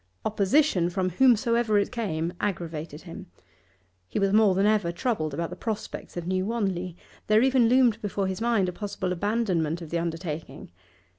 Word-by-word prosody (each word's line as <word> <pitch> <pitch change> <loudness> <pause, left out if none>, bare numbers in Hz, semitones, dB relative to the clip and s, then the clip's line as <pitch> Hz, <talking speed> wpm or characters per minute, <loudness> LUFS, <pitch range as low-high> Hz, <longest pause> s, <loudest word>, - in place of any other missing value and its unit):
Opposition, 205 - +2
from 185 +1 -1
whomsoever 235 0 +3
it 200 - +1
came, 175 -8 -2
aggravated 165 -5 -4
him. 170 -2 -9 0.8
He - - -5
was 195 0 +2
more 210 -3 +5
than 195 +2 +2
ever 210 -5 +2
troubled 170 -4 -1
about 165 +4 -3
the - - -5
prospects 220 -5 -5
of 175 - -4
New 185 +1 0
Wanley; 185 -6 -2 0.3
there 215 +2 +4
even 260 -3 +4
loomed 245 -3 +4
before 200 -1 -2
his 190 +2 -3
mind 230 -5 +2
a 180 - -3
possible 190 -2 -3
abandonment 180 -5 0
of 165 -3 -9
the 170 - 0
undertaking. 165 - -5
195 Hz, 165 wpm, -26 LUFS, 170-220 Hz, 0.8 s, more